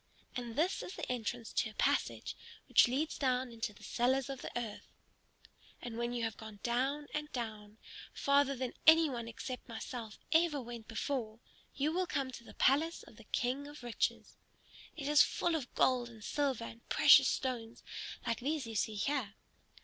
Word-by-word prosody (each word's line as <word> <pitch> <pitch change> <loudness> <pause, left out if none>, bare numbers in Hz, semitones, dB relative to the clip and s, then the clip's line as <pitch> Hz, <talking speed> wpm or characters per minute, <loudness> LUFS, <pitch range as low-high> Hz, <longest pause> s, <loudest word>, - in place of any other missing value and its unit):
And 240 -3 -4
this 340 +7 +1
is 365 - -7
the - - -4
entrance 240 -1 -3
to - - +1
a 215 - -14
passage - - 0 0.3
which - - +7
leads 280 +6 -1
down 255 -2 +1
into 230 -1 -3
the 210 - -17
cellars 260 +2 +1
of 270 - -6
the - - -5
earth. 225 -4 -5 0.9
And 240 -2 -6
when 235 +1 -1
you 240 -1 -2
have 225 -2 -2
gone 220 -2 -10
down 265 +5 0
and 300 0 -3
down, 215 -3 -5 0.3
farther 280 0 +3
than 255 -1 -3
any 320 -1 +8
one 235 -2 -4
except 250 +2 -6
myself 225 -1 -6
ever 325 -3 +4
went 235 -3 -8
before, 225 -1 -3 0.4
you 290 +2 +1
will 365 +2 0
come 275 -5 -1
to 235 - -9
the - - -13
palace 315 +5 +3
of 215 - -16
the 230 - -14
King 260 +6 -1
of 290 -3 -11
Riches. 240 -2 -2 0.6
It 285 -3 -4
is 295 0 +7
full 345 - +2
of 290 -6 -2
gold 250 -2 +3
and 220 -2 -13
silver 275 -4 0
and 230 +1 -11
precious 285 -3 +8
stones 240 -3 -2 0.4
like 230 -1 0
these 285 +2 -1
you 225 - -6
see 215 0 0
here. 220 -1 -1
250 Hz, 180 wpm, -34 LUFS, 230-285 Hz, 0.9 s, any